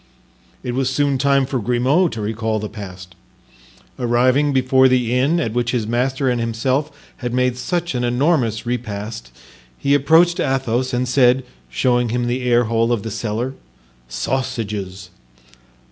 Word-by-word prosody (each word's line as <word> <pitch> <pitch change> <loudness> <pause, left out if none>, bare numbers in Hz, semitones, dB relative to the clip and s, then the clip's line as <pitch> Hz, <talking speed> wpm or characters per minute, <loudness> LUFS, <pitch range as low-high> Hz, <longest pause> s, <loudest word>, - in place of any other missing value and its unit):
It 125 - -3
was 130 +1 0
soon 140 0 0
time 140 0 +3
for 130 0 -2
Grimaud 130 - +2
to 110 - -5
recall 110 +1 -2
the 105 0 -4
past. 95 -4 -10 0.9
Arriving 130 +4 +2
before 130 0 +4
the 125 -2 +1
inn 140 +7 +2
at 115 -9 -2
which 120 0 -1
his 120 -4 0
master 130 +4 0
and 125 -2 +1
himself 130 +6 -1 0.3
had 120 -2 -4
made 125 -1 +1
such 170 +7 -2
an 125 -1 -1
enormous 125 -3 +1
repast, 110 - -4 0.5
he 140 - +1
approached 165 +5 +4
Athos 130 -3 0
and 125 +1 -1
said, 125 0 +3 0.3
showing 120 - +1
him 120 +1 -1
the 120 +2 -1
airhole 115 -1 +2
of 115 -4 0
the 110 - -5
cellar: 115 +4 -3 0.5
"Sausages!" 100 - -4
125 Hz, 145 wpm, -20 LUFS, 115-130 Hz, 0.9 s, before